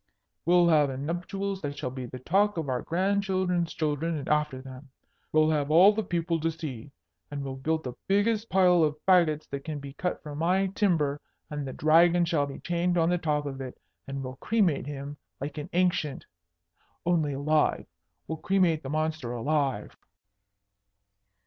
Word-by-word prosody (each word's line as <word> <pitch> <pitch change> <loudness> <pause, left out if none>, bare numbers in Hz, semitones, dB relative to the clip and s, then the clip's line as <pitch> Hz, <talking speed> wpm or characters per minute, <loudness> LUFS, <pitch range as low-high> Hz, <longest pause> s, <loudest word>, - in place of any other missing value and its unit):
"We'll 175 0 +5
have 150 -3 +4
a 130 - -5
nuptials 185 +6 -3
that 145 -1 -4
shall 125 - -3
be 130 -1 -6
the 130 - -8
talk 195 +9 +1
of 160 -4 -2
our 125 -1 -1
grandchildren's 185 -1 0
children, 155 +1 -1
and 140 - -6
after 150 -3 +1
them. 130 +1 -11 0.4
We'll 155 0 +4
have 145 -2 0
all 180 +7 +7
the 220 - -1
people 170 -3 -1
to 165 +1 0
see. 145 -6 -6 0.4
And 140 -1 -5
we'll 135 -1 -5
build 160 +4 -1
the 125 - -5
biggest 210 +3 +1
pile 180 -2 +4
of 150 -1 0
fagots 170 -5 +4
that 140 0 -5
can 155 -2 -4
be 140 -1 -8
cut 180 +5 -3
from 150 -1 -7
my 185 +4 +2
timber, 150 -9 +1 0.3
and 145 -2 -4
the 130 - -5
Dragon 170 +3 +4
shall 160 -4 +1
be 140 - -7
chained 175 +1 0
on 165 0 +3
the 180 - +1
top 150 -2 0
of 135 -1 -5
it, 130 -1 -8 0.3
and 135 0 -4
we'll 130 0 -7
cremate 185 - +1
him 145 0 -6 0.2
like 145 +3 -5
an 150 +4 -7
Ancient, 175 -6 0 0.8
only 160 -4 +1
alive! 150 +2 +1 0.4
We'll 160 -1 -4
cremate 180 -5 +2
the 135 - -7
monster 155 -4 -2
alive!" 135 -2 -1
155 Hz, 175 wpm, -28 LUFS, 140-175 Hz, 0.8 s, all